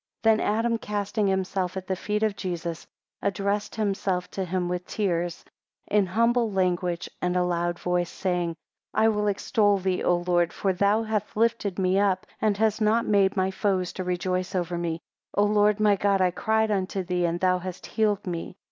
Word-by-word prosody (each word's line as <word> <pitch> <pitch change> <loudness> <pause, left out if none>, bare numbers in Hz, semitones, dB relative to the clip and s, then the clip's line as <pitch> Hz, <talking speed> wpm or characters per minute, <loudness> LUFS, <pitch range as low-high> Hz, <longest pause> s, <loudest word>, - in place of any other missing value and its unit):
4 225 - +6
Then 215 - +2
Adam, 230 +2 +1
casting 210 0 -1
himself 190 -1 -1
at 190 - -5
the 190 - -1
feet 210 +3 -2
of 215 -2 +1
Jesus, 170 -3 -4 0.3
addressed 200 +2 -1
himself 195 -4 -1
to 195 - -3
him 180 0 -1
with 180 0 -3
tears, 175 -5 -2 0.4
in 205 -2 +2
humble 230 +3 +2
language, 180 -2 0
and 180 0 0
a 180 - +3
loud 175 0 -1
voice, 180 -1 0
saying, 175 -3 -1 0.4
5 215 - +3
"I - - +6
will 210 -1 0
extol 205 0 +2
thee, 185 -1 -1
O 175 - +3
Lord, 175 -1 +1
for 195 -1 0
thou 200 +4 +2
halt 215 -2 -1
lifted 220 -4 +1
me 190 0 +2
up, 195 -2 +1 0.2
and 210 -2 +2
hast 220 0 +1
not 220 +2 +3
made 200 -1 +3
my 190 0 +1
foes 190 -2 0
to 185 - -4
rejoice 180 +1 -2
over 175 -1 -1
me. 170 -1 -2 0.3
O 205 - +4
Lord 210 0 +3
my 210 -1 +4
God, 200 0 +2
I 185 -1 +3
cried 220 +2 +1
unto 190 -1 -1
thee, 180 -1 0
and 170 0 -1
thou 185 0 +2
hast 185 0 -7
healed 215 -2 0
me." 175 +1 -5
190 Hz, 190 wpm, -26 LUFS, 180-210 Hz, 0.4 s, 4